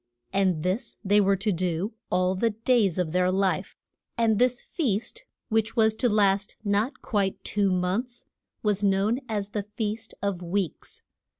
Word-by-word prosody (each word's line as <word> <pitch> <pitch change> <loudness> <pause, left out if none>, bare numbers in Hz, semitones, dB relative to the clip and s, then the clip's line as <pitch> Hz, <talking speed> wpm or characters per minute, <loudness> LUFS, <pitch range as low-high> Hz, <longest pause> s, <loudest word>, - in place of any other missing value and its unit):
And 185 -5 +2
this 210 +7 -2
they 205 +2 +5
were 195 0 +3
to 200 +3 0
do 180 +3 -1 0.2
all 185 0 +2
the 230 +5 +1
days 225 -4 +2
of 180 -4 0
their 180 +1 +2
life. 190 0 0 0.4
And 225 -2 +3
this 250 0 +3
feast, 285 - -2 0.2
which 225 0 +1
was 220 -2 +4
to 245 - +2
last 200 -1 +2
not 205 +5 0
quite 200 -4 -1
two 200 -1 +1
months, 190 +7 -1 0.4
was 205 -2 +2
known 200 +4 +2
as 205 -2 -1
the 210 -1 -2
Feast 215 +2 -4
of 200 -3 -1
the 180 - -8
Weeks. 180 -1 -3
205 Hz, 165 wpm, -26 LUFS, 190-225 Hz, 0.4 s, they